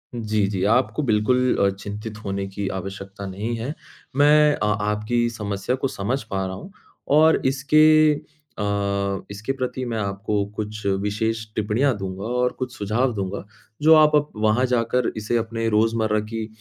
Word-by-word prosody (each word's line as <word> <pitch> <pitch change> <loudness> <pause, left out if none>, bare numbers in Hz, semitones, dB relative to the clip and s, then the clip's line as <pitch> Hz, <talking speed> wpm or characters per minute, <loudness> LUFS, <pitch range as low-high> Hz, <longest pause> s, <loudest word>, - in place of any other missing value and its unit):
जी, 110 -3 0
जी 95 -2 -2
आपको 130 +5 +1
बिल्कुल 125 +2 +2
अ, 100 - +3
चिंतित 105 +2 -7
होने 100 0 -2
की 100 +1 -4
आवश्यकता 95 +1 -8
नहीं 105 +5 -3
है। 120 +6 -4 0.4
मैं 150 +1 +5
अ - - -2 0.2
आपकी 105 +3 0
समस्या 105 +1 -3
को 130 - -1
समझ 130 +4 -2
पा 95 -3 -3
रहा 95 0 -4
हूँ 140 - -10 0.5
और 160 +1 +5
इसके 155 +3 +5 0.4
अ, 100 -1 -1
इसके 105 +6 -4
प्रति 130 -1 -3
मैं 115 - -2
आपको 100 0 -1
कुछ 110 0 -5
विशेष 105 +3 -1
टिप्पणियाँ 115 +5 +1
दूँगा 95 0 -5
और 125 +1 0
कुछ 130 -1 -4
सुझाव 115 +5 0
दूँगा, 100 -1 -4 0.4
जो 160 +2 +7
आप 155 -1 +6 0.2
वहाँ 110 +4 +2
जाकर 125 0 +1
इसे 110 +2 0
अपने 115 0 -2
रोज़मर्रा 110 0 +2
की 110 +1 -5
110 Hz, 155 wpm, -23 LUFS, 100-125 Hz, 0.5 s, जो